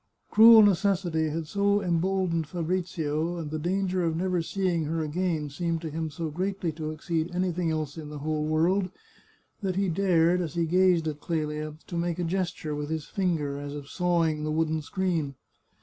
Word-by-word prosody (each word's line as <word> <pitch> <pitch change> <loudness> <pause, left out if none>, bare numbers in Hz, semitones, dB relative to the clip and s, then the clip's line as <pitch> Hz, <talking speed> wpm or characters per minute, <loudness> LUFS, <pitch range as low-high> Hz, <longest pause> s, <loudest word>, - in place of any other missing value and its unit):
Cruel 225 0 +9
necessity 180 -5 +2
had 160 +1 -3
so 200 +4 +2
emboldened 175 -2 0
Fabrizio, 170 -2 -2
and 155 -3 -5
the 155 - -2
danger 185 +2 0
of 165 -1 0
never 180 0 0
seeing 175 -2 -1
her 160 +1 -1
again 155 -2 -1
seemed 165 +3 -1
to 160 -2 -5
him 160 +1 -3
so 160 +1 -4
greatly 185 +1 -2
to 155 0 -5
ex 155 0 -11
ceed 170 +1 -1
anything 180 -2 0
else 155 -1 -3
in 150 -2 -7
the 150 - -7
whole 155 +1 -2
world, 170 +5 +2 0.7
that 190 -3 -1
he 195 0 +1
dared, 175 -1 +3
as 170 -1 -4
he 170 -1 +1
gazed 180 -1 +3
at 150 -1 -3
Clelia, 155 -2 -3
to 175 - -7
make 170 0 -1
a 180 - -1
gesture 175 -3 -2
with 145 0 -4
his 160 -2 -3
finger 160 -7 -1
as 145 0 -6
of 145 -1 -8
sawing 170 -4 +1
the 155 - -2
wooden 160 0 0
screen. 165 -4 -1
165 Hz, 185 wpm, -27 LUFS, 155-185 Hz, 0.7 s, Cruel